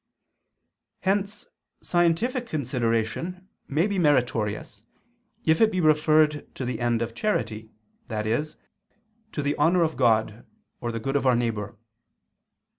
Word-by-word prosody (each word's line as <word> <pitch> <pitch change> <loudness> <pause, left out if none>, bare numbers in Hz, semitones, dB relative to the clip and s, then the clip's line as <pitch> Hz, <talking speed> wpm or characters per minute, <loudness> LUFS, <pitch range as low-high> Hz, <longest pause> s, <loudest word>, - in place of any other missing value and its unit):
Hence 200 +2 -1 0.4
scientific 195 +9 +1
consideration 130 - -2 0.2
may 155 +6 +1
be 200 -2 -1
meritorious 115 - 0 0.6
if 160 +4 +3
it 220 -1 +5
be 185 - -1
referred 155 -1 +3
to 130 - -4
the 125 - -3
end 120 -1 +1
of 115 0 -5
charity, 110 - -2 0.4
i.e. 110 +5 0 0.9
to 150 - -3
the 145 +1 0
honor 170 +4 +4
of 160 -1 -1
God 110 -2 +2 0.4
or 120 - -3
the 115 - -4
good 135 +5 -3
of 140 -1 +2
our 125 - +5
neighbor. 110 -3 -2
140 Hz, 125 wpm, -25 LUFS, 115-170 Hz, 0.9 s, it